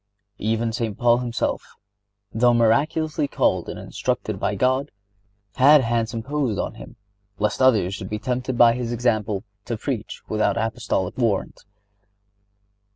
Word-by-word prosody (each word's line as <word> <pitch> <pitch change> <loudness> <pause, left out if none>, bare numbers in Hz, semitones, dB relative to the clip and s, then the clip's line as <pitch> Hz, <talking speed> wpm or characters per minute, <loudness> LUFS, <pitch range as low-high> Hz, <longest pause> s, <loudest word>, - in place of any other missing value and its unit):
(76) 110 - -3
Even 115 0 -1
St. 110 -3 -3
Paul 120 0 +4
himself, 120 -2 -2 0.7
though 120 +2 +4
miraculously 145 +7 +1
called - - 0
and - - -6
instructed - - -3
by - - -1
God, 130 +3 +1 0.7
had 145 +3 +7
hands 115 -2 0
imposed 125 -1 -2
on - - -2
him,(77) - - -12 0.4
lest 105 +5 -1
others 110 -8 +4
should 95 -1 -6
be 105 - -2
tempted 125 +3 -3
by 120 -1 +7
his 120 -1 -3
example 110 -4 0 0.2
to 115 - -3
preach 115 -2 -5
without 110 +1 0
Apostolic 115 -5 -2
warrant. 110 -6 -1
115 Hz, 140 wpm, -23 LUFS, 110-130 Hz, 0.7 s, had